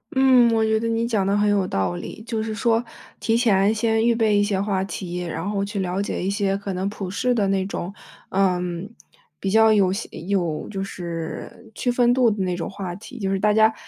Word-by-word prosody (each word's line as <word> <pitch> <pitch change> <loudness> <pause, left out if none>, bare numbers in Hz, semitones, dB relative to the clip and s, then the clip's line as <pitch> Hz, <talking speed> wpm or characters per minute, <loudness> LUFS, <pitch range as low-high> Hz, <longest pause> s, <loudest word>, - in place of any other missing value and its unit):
嗯， 260 -2 +6
我 225 -1 +2
觉 220 0 +2
得 230 - -2
你 230 0 0
讲 215 -5 0
的 200 - +2
很 210 0 +3
有 200 -2 +2
道 95 - -1
理。 215 - -8
就 225 -2 -2
是 220 0 -3
说， 230 +1 +2 0.4
提 225 - +1
前 210 -3 +3
先 225 0 +1
预 235 -1 +3
备 220 -2 +3
一 - - +4
些 205 -2 0
话 195 -1 0
题， 180 -3 -5
然 175 +1 -4
后 200 -1 -1
去 205 0 -4
了 185 +1 -1
解 200 - -3
一 190 - 0
些 200 -1 0
可 200 0 -4
能 185 +1 -2
普 195 -3 -6
世 245 +5 +1
的 210 -4 +2
那 195 -1 +1
种， 190 -1 -5 0.4
嗯， 180 -1 0 0.5
比 195 - -3
较 220 +1 +6
有 195 -3 +3
些 200 +4 -3
有 175 -4 -1
就 195 -2 -4
是 175 +4 -6
区 245 - 0
分 245 0 +3
度 245 -3 +4
的 205 -1 -2
那 180 -1 -1
种 175 - -4
话 190 -3 -6
题， 235 +6 -11
就 195 -2 -1
是 195 - +1
大 210 +2 +2
家 220 +1 +5
200 Hz, 245 characters per minute, -23 LUFS, 190-225 Hz, 0.5 s, 嗯